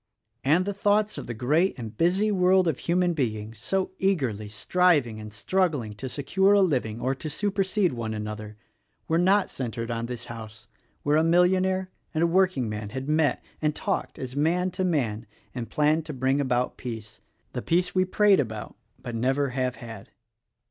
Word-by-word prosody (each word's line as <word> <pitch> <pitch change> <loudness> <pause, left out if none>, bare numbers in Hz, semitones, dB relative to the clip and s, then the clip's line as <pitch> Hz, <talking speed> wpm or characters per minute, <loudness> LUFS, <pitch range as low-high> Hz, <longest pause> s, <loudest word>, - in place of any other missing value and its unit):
And 160 +7 +3
the 200 - -2
thoughts 205 +1 +1
of - - -8
the 120 - -4
great 150 - +1
and 115 -3 -7
busy 185 - +2
world 185 -1 +4
of 155 -5 0
human 175 0 +1
beings 110 -6 -3
so 190 +11 -1
eagerly 130 - 0
striving 140 - +2
and 105 0 -8
struggling 145 - 0
to 130 +3 -5
secure 190 +10 +2
a 200 - +5
living 125 - 0
or 130 +2 0
to 155 +3 -6
supersede 195 0 0
one 115 -2 -3
another, 105 0 -6 0.5
were 165 +1 +2
not 190 +3 +3
centered 115 -2 -4
on 115 0 -2
this 120 -1 -6
house 110 -1 -9 0.4
where 145 +1 +3
a 160 - +4
millionaire 185 +2 +2 0.2
and 160 - +2
a 170 0 +1
workingman 125 - +1
had 130 +4 -5
met 155 -1 +2 0.2
and 155 -1 +1
talked - - -2
as 130 0 -6
man 175 +5 +1
to 185 +1 -2
man 120 - -1 0.3
and 120 -2 -5
planned 155 +1 +2
to 155 - -5
bring 135 +2 +1
about 125 -2 0
peace 110 -4 -7 0.2
— - - -43
the - - -3
Peace 180 +2 +1
we 185 - +3
prate 200 +1 +4
about 110 -5 -4 0.3
but 120 - -5
never 135 +4 +1
have 125 0 -1
had. 110 -4 -10
145 Hz, 180 wpm, -26 LUFS, 115-180 Hz, 0.5 s, a